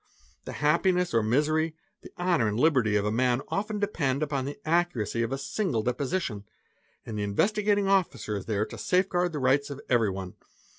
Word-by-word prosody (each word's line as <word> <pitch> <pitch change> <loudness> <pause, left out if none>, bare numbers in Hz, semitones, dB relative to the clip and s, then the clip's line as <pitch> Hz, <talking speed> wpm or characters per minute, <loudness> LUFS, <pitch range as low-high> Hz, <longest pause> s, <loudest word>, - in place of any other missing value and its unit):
'The - - -6
happiness 175 +3 +2
or 115 - +4
misery, 155 +8 +1 0.3
the - - -11
honour 175 -10 +2
and 105 +2 -1
liberty 130 -8 +3
of 105 0 +1
a 105 - 0
man 125 +2 +2
often 210 +2 -2
depend 155 -9 0
upon 140 -3 -2
the 145 - -6
accuracy 155 - +1
of 115 +1 -1
a 135 - -1
single 135 - -1
deposition 125 - -2 0.6
and 110 -2 -5
the - - -1
Investi 195 - +1
gating 205 -1 +2
Officer 190 - +1
is 100 - -6
there 105 -1 0
to - - -10
safe 185 +1 +2
guard 180 -1 0
the 155 - -4
rights 140 +2 +2
of 140 -1 -6
everyone. 95 -6 0
140 Hz, 190 wpm, -27 LUFS, 115-175 Hz, 0.6 s, or